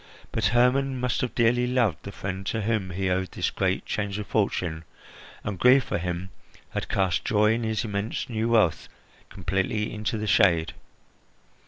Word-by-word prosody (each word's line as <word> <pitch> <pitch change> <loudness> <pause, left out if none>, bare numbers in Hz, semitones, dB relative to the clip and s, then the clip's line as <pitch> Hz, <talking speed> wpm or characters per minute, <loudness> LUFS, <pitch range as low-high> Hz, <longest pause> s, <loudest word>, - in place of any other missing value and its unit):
But 115 - -1
Hermon 125 +4 +3
must 125 -1 0
have 125 - -3
dearly 120 +1 +3
loved 120 -9 +1
the 100 - -8
friend 95 -1 -5
to 110 -2 -1
whom 105 -3 0
he 95 +2 -2
owed 95 +1 -1
this - - -1
great - - -1
change 100 -2 -2
of 105 - -4
fortune, 90 -7 -1 0.6
and 100 -4 -4
grief 130 +1 +6
for - - -2
him 90 +1 -4 0.4
had - - -4
cast 95 -6 +1
joy 105 0 +3
in 115 - -1
his 110 +1 -1
immense 105 +1 -3
new 115 -1 -1
wealth 110 -8 +2 0.4
completely 95 +3 -2
into 110 +2 -2
the 110 - -3
shade. 85 -5 +3
105 Hz, 170 wpm, -26 LUFS, 95-115 Hz, 0.6 s, grief